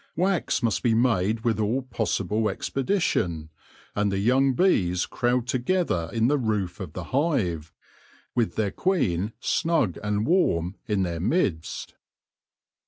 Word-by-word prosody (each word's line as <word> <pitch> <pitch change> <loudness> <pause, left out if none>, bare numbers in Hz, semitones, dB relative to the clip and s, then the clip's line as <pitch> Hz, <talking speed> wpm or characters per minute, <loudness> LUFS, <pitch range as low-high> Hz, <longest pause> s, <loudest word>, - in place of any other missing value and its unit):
Wax 180 -6 0
must 115 -2 +1
be 115 -3 +2
made 110 -2 +2
with 115 -2 0
all 115 +5 0
possible 110 -3 -1
expedition, 100 - -1 0.4
and 105 -1 +1
the 95 - -1
young 130 +6 +3
bees 90 - +2
crowd 120 0 0
together 125 - 0
in 115 0 +2
the 145 +2 +2
roof 105 -7 -1
of 90 -5 -7
the 90 - -5
hive, 105 - 0 0.6
with 120 -3 0
their 105 -3 0
queen 110 - 0
snug 160 - +1
and 105 +1 -1
warm 95 - +1
in 105 -3 +1
their 85 -2 -3
midst. 95 - -1
110 Hz, 135 wpm, -25 LUFS, 90-130 Hz, 0.6 s, young